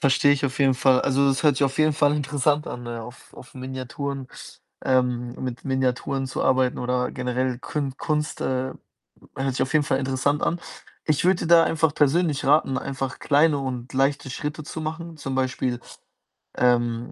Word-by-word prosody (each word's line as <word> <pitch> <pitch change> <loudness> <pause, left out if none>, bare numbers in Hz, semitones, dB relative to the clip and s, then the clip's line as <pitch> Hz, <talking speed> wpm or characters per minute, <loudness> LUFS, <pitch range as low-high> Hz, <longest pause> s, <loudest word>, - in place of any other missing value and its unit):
Verstehe 140 +1 +4
ich 145 - -1
auf 130 -2 -2
jeden 135 -2 +4
Fall. 130 0 +4
Also, 140 +1 +2
das 135 +3 +1
hört 150 -3 +4
sich 140 - +3
auf 135 +1 -2
jeden 155 0 +4
Fall 145 0 +3
interessant 145 0 0
an, 120 - -6
ne, 120 -1 -5
auf, 120 +3 -13
auf - - -14
Miniaturen, 130 +1 -5 0.6
ähm 125 -2 +1
mit 125 -2 -5
Miniaturen 130 0 0
zu 130 - -3
arbeiten, 130 -1 +2
oder 125 0 -1
generell 125 0 -1
Kün 140 -1 -4
Kunst, 150 -2 -2
äh, 130 0 -1 0.7
hört 135 0 -1
sich 130 - 0
auf 130 - -2
jeden 155 -2 +3
Fall 135 - +1
interessant 135 +2 0
an. 170 +1 0 0.4
Ich 155 0 +1
würde 185 0 +3
dir - - -2
da 165 0 +7
einfach 160 -2 +1
persönlich 150 0 +2
raten, 140 -1 +3
einfach 135 -1 -4
kleine 145 0 +3
und 130 -2 -5
leichte 140 +1 +1
Schritte 150 +4 -4
zu 160 - -6
machen. 160 +1 -5
Zum 135 -3 -5
Beispiel, 130 -1 -1 0.8
ähm, 120 -1 +1
135 Hz, 180 wpm, -24 LUFS, 130-145 Hz, 0.8 s, da